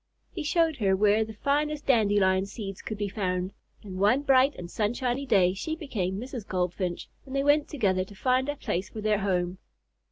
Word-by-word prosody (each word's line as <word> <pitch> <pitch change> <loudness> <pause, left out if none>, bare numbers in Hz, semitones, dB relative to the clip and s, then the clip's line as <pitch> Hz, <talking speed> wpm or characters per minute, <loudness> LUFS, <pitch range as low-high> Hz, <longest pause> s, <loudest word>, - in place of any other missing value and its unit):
He 365 - -5
showed 320 0 +1
her 195 -4 +2
where 210 +2 +3
the 220 0 -9
finest 295 +4 0
dandelion 200 -6 +3
seeds 195 -2 -7
could 215 - -5
be 205 0 -1
found, 185 -2 -2 0.3
and 190 -3 -7
one 215 +8 +3
bright 270 0 +4
and 175 - -7
sunshiny 245 +7 -1
day 190 -6 +4
she 315 +11 -3
became 200 - -3
Mrs. 245 -3 -7
Goldfinch, 180 -1 -2 0.2
and 270 0 -8
they 275 - +1
went 290 +1 +3
together 195 - 0
to 205 - -14
find 255 +5 +1
a 290 - -1
place 190 -8 -3
for 215 - -7
their 210 -1 +1
home. 180 -2 -1
210 Hz, 190 wpm, -27 LUFS, 190-270 Hz, 0.3 s, bright